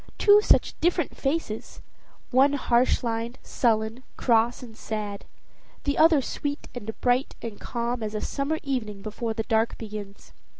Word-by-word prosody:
two 415 0 +7
such - - +3
different 345 -2 +1
faces: 275 -6 -3 0.5
one 270 +3 +5
harsh 255 -2 +2
lined, 230 +1 -2
sullen, 225 0 0 0.2
cross, 235 0 +2
and 225 -3 -11
sad; 210 -2 -5 0.6
the 285 0 0
other 315 -3 +5
sweet 285 +3 -4
and 220 -3 -7
bright 250 +2 +2
and 225 -3 -7
calm 235 0 -2
as 215 0 -3
a - - 0
summer 280 +3 -1
evening 215 -8 -3
before 220 +1 -3
the 225 - -1
dark 220 +1 +1
begins. 205 -2 -8
235 Hz, 145 wpm, -26 LUFS, 220-275 Hz, 0.6 s, two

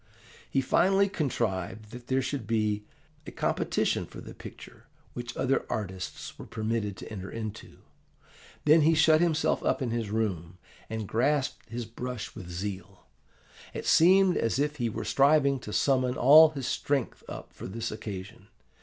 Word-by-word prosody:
He 135 - +1
finally 195 +8 +3
contrived 110 - -2
that 120 0 -10
there 130 0 +1
should 130 -3 -4
be 105 -2 0 0.4
a - - -3
competition - - 0
for - - -11
the - - -10
picture - - -12 0.3
which 120 0 -6
other 135 +1 +1
artists 95 -3 -5
were - - -9
permitted 110 -2 -2
to - - -9
enter 95 -3 -6
into. 110 -2 -7 0.8
Then 155 +2 +6
he 160 +2 +4
shut 155 0 +5
himself 160 -2 +1
up - - +1
in 130 -4 -2
his 115 -3 -2
room, 95 -6 -2 0.3
and 110 -2 -4
grasped 135 +6 0
his 120 0 -4
brush 115 0 -6
with 95 -6 -9
zeal. 95 +1 -6 0.7
It - - -5
seemed 185 +2 +5
as 115 +1 0
if 150 +1 0
he 120 -3 0
were - - -5
striving 140 -1 +3
to 105 - -8
summon 130 +1 +2
all 155 +5 +8
his 140 -4 -6
strength 140 -1 -1
up - - -8
for - - -8
this 115 +4 -4
occasion. 100 -3 -7
120 Hz, 160 wpm, -28 LUFS, 105-140 Hz, 0.8 s, all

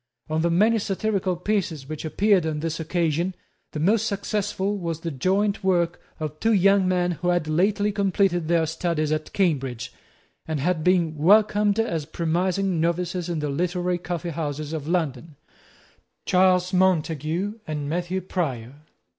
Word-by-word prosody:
Of 155 +1 0
the 170 - +2
many 215 +7 +3
satirical 195 -2 -1
pieces 180 -6 -2
which 155 0 -6
appeared 195 +4 +3
on 150 -1 -2
this 165 0 -3
occasion, 170 +2 -1 0.4
the 150 - -5
most 215 +7 +2
successful 200 0 -2
was 165 -2 -4
the 165 - -3
joint 195 +9 0
work 175 -2 +1 0.2
of 155 -1 -5
two 225 0 +2
young 195 -1 +4
men 180 -1 +1
who 175 +1 -4
had 175 -3 +1
lately 200 +6 +1
completed 195 -4 +1
their 165 -1 +2
studies 160 -1 -1
at 155 0 -2
Cambridge, 135 - -1 0.5
and 160 -2 -2
had 160 +2 0
been 170 -3 +2
welcomed 205 +4 +4
as 165 -10 -1
promising 175 +2 0
novices 175 +1 -1
in 170 - -1
the 150 - -2
literary 175 +4 -1
coffee 175 0 -4
houses 150 -1 -4
of 155 -2 -4
London, 160 -4 -2 0.9
Charles 185 0 +3
Montague 180 +2 +1
and 150 -2 -3
Matthew 175 +4 -2
Prior. 135 -10 -3
175 Hz, 150 wpm, -24 LUFS, 155-190 Hz, 0.9 s, young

